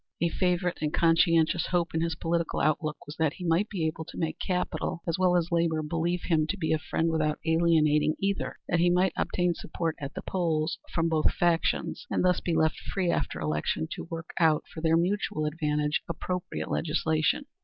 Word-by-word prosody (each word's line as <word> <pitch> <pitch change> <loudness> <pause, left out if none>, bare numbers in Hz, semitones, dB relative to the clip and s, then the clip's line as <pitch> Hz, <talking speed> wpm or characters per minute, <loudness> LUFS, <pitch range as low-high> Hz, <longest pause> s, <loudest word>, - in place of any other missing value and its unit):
A 170 - +2
favorite 180 0 0
and 150 -1 0
conscientious 165 0 +3
hope 175 -2 0
in 160 - 0
his 165 -1 -1
political 165 +1 -1
outlook 155 0 0
was 145 +2 -9
that 160 -2 +1
he 180 - -7
might 170 +5 +2
be 180 -6 -2
able 160 0 -2
to - - -11
make 160 0 -2
capital 180 -2 -2
as 165 +1 -1
well 180 -1 +4
as 170 -1 -1
labor 165 -2 +1
believe 165 +3 -1
him 155 -3 +2
to 200 - -2
be 160 -4 0
a 160 - +1
friend 160 +1 -1
without 155 -1 0
alienating 160 -2 +3
either; 195 0 -1
that 175 - +1
he 175 +1 +4
might 180 +2 +3
obtain 180 -1 0
support 165 0 -3
at 140 +1 -6
the - - -5
polls 165 -3 -1
from 165 -1 +1
both 160 -2 +2
factions, 175 - 0
and - - +1
thus 180 -1 +3
be 170 - -1
left 160 -1 +2
free 185 -3 -1
after - - -2
election 75 +1 -1
to - - -6
work 165 0 -6
out 160 -3 +4
for 160 - -6
their 165 0 +3
mutual 175 -3 0
advantage 150 -1 0
appropriate 180 +1 -4
legislation. 160 - 0
165 Hz, 195 wpm, -28 LUFS, 155-175 Hz, -, well